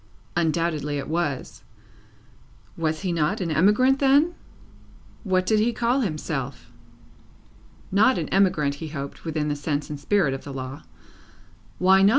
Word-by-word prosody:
Undoubtedly 160 Hz, -3 st, 0 dB
it 140 Hz, -, -4 dB
was. 155 Hz, -5 st, -2 dB, 1.1 s
Was 160 Hz, -1 st, -1 dB
he 185 Hz, -2 st, -1 dB
not 170 Hz, +5 st, 0 dB
an 175 Hz, -4 st, -2 dB
emigrant 210 Hz, -, +4 dB
then? 285 Hz, +5 st, +4 dB, 0.9 s
What 185 Hz, -3 st, +1 dB
did 215 Hz, +3 st, +3 dB
he 225 Hz, +3 st, +2 dB
call 240 Hz, +3 st, +1 dB
himself? 155 Hz, -10 st, -4 dB, 1.2 s
Not 220 Hz, +7 st, +4 dB
an -, -, -2 dB
emigrant, 180 Hz, -7 st, +2 dB
he 160 Hz, -, -4 dB
hoped, 140 Hz, -1 st, -7 dB
within 155 Hz, -2 st, -1 dB
the 145 Hz, -, -1 dB
sense 145 Hz, 0 st, -3 dB
and 145 Hz, -, -5 dB
spirit 155 Hz, -2 st, +2 dB
of 135 Hz, -, -6 dB
the 140 Hz, -, -7 dB
law. 130 Hz, +1 st, -6 dB, 1.0 s
Why 190 Hz, +1 st, +5 dB
not? 195 Hz, -, +6 dB
165 Hz, 145 wpm, -24 LUFS, 150-205 Hz, 1.2 s, not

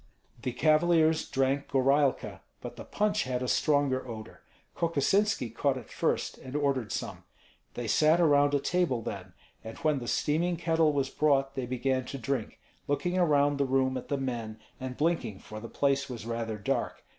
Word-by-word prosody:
The 125 Hz, -, -2 dB
cavaliers 160 Hz, +4 st, +3 dB
drank 135 Hz, +1 st, 0 dB
gorailka, 135 Hz, +1 st, +1 dB, 0.2 s
but -, -, -8 dB
the -, -, -8 dB
punch 210 Hz, 0 st, 0 dB
had 125 Hz, 0 st, -2 dB
a -, -, -2 dB
stronger 140 Hz, -2 st, +1 dB
odor. 110 Hz, -2 st, -9 dB, 0.3 s
Kokosinski 165 Hz, -, +1 dB
caught 135 Hz, +3 st, +1 dB
it 125 Hz, -, -10 dB
first, -, -, -1 dB
and 130 Hz, +2 st, -9 dB
ordered 140 Hz, -7 st, 0 dB
some. -, -, -4 dB, 0.5 s
They 120 Hz, -1 st, -4 dB
sat 155 Hz, +8 st, +4 dB
around 145 Hz, -3 st, +4 dB
a -, -, +3 dB
table 150 Hz, -7 st, 0 dB
then; 95 Hz, -4 st, -6 dB, 0.3 s
and 110 Hz, 0 st, -8 dB
when 155 Hz, -3 st, +1 dB
the 120 Hz, -, -7 dB
steaming 170 Hz, +7 st, 0 dB
kettle 165 Hz, -2 st, +2 dB
was 140 Hz, -2 st, -1 dB
brought 135 Hz, -2 st, +2 dB
they 130 Hz, -2 st, -4 dB
began 130 Hz, +1 st, -1 dB
to 135 Hz, -, -6 dB
drink, 130 Hz, -2 st, -3 dB, 0.3 s
looking 175 Hz, +6 st, 0 dB
around 145 Hz, -4 st, +3 dB
the 140 Hz, -, +3 dB
room 130 Hz, 0 st, +1 dB
at 130 Hz, -, -5 dB
the 140 Hz, -, -1 dB
men 120 Hz, -5 st, -4 dB, 0.2 s
and 130 Hz, -1 st, -6 dB
blinking, 160 Hz, -, 0 dB
for 110 Hz, +3 st, -9 dB
the 115 Hz, +1 st, -8 dB
place 140 Hz, -1 st, 0 dB
was 120 Hz, -3 st, -7 dB
rather 115 Hz, -2 st, -3 dB
dark. 125 Hz, +4 st, -2 dB
135 Hz, 175 wpm, -29 LUFS, 125-155 Hz, 0.5 s, sat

